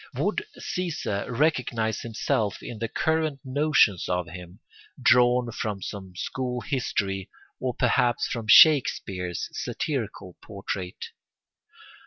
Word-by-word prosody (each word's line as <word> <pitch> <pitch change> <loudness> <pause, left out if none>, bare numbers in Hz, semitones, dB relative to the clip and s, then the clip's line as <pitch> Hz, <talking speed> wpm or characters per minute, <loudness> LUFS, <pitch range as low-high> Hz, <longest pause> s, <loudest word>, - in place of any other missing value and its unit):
Would 430 - 0
Caesar 165 - -3
recognise 120 -5 0
himself 110 -2 -1
in 115 - -7
the 115 - -2
current 160 +2 0
notions 135 - +2
of 90 -1 0
him, 90 +2 -10 0.4
drawn 125 -1 +4
from 105 -3 -4
some 95 -3 -7
school 125 +6 -3
history, 100 -8 -2 0.3
or 130 -2 -2
perhaps 120 -1 +2
from 115 -3 -4
Shakespeare's 95 - +5
satirical 110 - -4
portrait? 95 -2 -6
115 Hz, 105 wpm, -26 LUFS, 95-130 Hz, 0.4 s, Shakespeare's